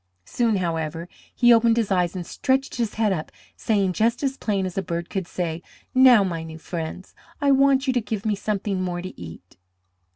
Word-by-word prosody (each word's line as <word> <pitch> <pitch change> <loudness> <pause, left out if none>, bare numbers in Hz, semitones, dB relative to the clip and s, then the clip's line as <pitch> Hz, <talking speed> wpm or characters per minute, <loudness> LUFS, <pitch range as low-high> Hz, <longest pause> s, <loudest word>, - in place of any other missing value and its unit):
Soon, 235 -3 0
however, 165 -2 -2 0.3
he 240 -1 +6
opened 230 0 +4
his 225 -4 0
eyes 180 -1 +1
and 180 -2 -4
stretched 265 +7 -1
his 230 -3 -2
head 215 -3 +2
up, 155 -4 -5 0.2
saying 200 -4 0
just 230 +7 +1
as 270 -1 0
plain 200 -7 -1
as 185 - -5
a 195 - 0
bird 170 -2 -5
could 190 -3 -3
say, 170 -2 -3 0.3
"Now, 255 -5 +7
my 170 -4 -3
new 160 0 -8
friends, 165 +2 -6 0.3
I 285 -1 +3
want 275 0 +4
you 260 - +1
to 245 - +1
give 215 -1 -5
me 215 - +2
something 200 -1 -2
more 175 -1 -3
to 185 - -9
eat." 90 +1 -11
195 Hz, 200 wpm, -23 LUFS, 175-235 Hz, 0.3 s, Now